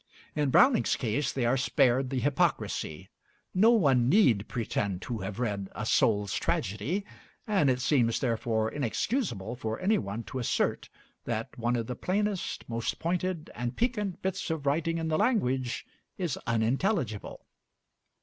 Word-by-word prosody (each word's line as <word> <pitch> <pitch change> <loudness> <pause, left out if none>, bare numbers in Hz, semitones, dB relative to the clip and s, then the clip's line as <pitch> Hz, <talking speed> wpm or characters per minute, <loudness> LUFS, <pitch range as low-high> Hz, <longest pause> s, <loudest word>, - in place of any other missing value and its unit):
In 150 -2 +1
Browning's 255 - +5
case 130 +4 -1
they 130 -3 -1
are 120 +3 +3
spared 130 0 +2
the 135 - -2
hypocrisy. 95 - -1 0.4
No 210 +5 +5
one 135 - +4
need 130 - +4
pretend 100 -5 -2
to 120 -3 -4
have 95 +2 -5
read 100 -5 -2
'A 110 - -3
Soul's 105 -3 +2
Tragedy'; 115 - -1 0.4
and 195 -10 +2
it 125 -1 +1
seems, 125 -4 +2
therefore, 115 -3 0
inexcusable 125 - -2
for 110 -2 -3
any 210 +4 +2
one 100 +3 -4
to 130 - -5
assert 120 - 0 0.4
that - - -3
one 120 +1 0
of 115 -1 -1
the 125 - -4
plainest, 200 - -2
most 115 0 -2
pointed 175 -1 -2
and 120 +1 -4
piquant 210 -6 -1
bits 190 -1 -2
of 160 -3 -3
writing 165 +4 +1
in 165 -1 -2
the 155 0 +1
language 130 - +1 0.3
is 175 -7 -1
unintelligible. 115 - -1
130 Hz, 150 wpm, -29 LUFS, 115-175 Hz, 0.4 s, Browning's